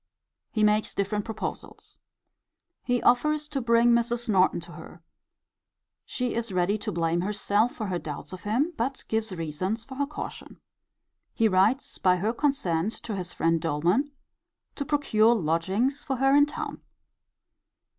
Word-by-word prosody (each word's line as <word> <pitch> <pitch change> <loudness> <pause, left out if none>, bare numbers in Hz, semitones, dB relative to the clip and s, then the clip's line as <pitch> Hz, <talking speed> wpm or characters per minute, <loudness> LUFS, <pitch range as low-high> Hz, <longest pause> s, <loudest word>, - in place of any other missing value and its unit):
He 215 - 0
makes 210 0 +2
different 205 +1 -1
proposals. 225 -1 -7 0.8
He 245 -2 0
offers 300 +5 +3
to 275 -2 -2
bring 235 0 +4
Mrs. 235 +1 +1
Norton 190 -3 +3
to - - -11
her. - - -12 1.0
She 250 -2 -2
is 235 -2 -2
ready 185 +3 +1
to - - -3
blame 165 0 0
herself 205 +3 +1
for 220 - -4
her 185 -3 -2
doubts 150 +1 -7
of 185 - -8
him: 255 +11 0
but 260 +3 -2
gives 220 -1 -1
reasons 185 +6 -3
for 265 - -10
her 285 0 0
caution. 300 - -8 0.8
He 225 - +3
writes 210 +7 +2
by 185 -1 +4
her 210 +6 -1
consent 220 - 0
to 220 - -4
his 180 -2 -4
friend 165 0 +1
Doleman, 170 - +1 0.7
to 285 - -3
procure 240 -7 +3
lodgings 195 - 0
for 270 -3 -2
her 270 +2 +3
in 290 0 +6
town. 295 - -6
220 Hz, 150 wpm, -27 LUFS, 185-250 Hz, 1.0 s, in